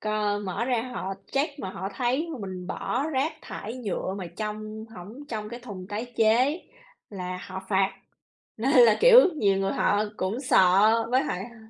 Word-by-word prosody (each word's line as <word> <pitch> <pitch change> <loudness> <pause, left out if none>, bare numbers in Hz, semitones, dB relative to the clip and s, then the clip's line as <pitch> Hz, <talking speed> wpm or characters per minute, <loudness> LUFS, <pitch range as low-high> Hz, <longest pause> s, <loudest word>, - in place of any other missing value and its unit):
c - - -9 0.4
mở 190 +5 -2
ra 245 -3 0
họ 195 +1 -4 0.2
check 285 +1 -1
mà 190 - -4
họ 190 +1 -5
thấy 260 +7 0
mà 270 - -6
mình 180 -1 -7
bỏ 270 - -2
rác 290 +2 0
thải 225 +5 -7
nhựa 200 -5 -3
mà 185 - -5
trong 215 0 -5
hổng 215 +11 -10
trong 215 -2 -4
cái 240 +2 -8
thùng 195 -6 -8
tái 225 +4 -5
chế 245 +9 +3 0.5
là 180 -2 -5
họ 190 +1 -6
phạt, 190 -1 +2 0.6
nên 250 +5 0
là, 230 -3 +7
kiểu, - - +9 0.2
nhiều 200 -6 +2
người 195 0 0
họ 205 +1 +2
cũng 200 +7 -2
sợ 215 -1 +4
với 260 +2 +3
hại, 185 -11 -3
ơ 235 -1 -13
220 Hz, 185 wpm, -26 LUFS, 195-255 Hz, 0.6 s, kiểu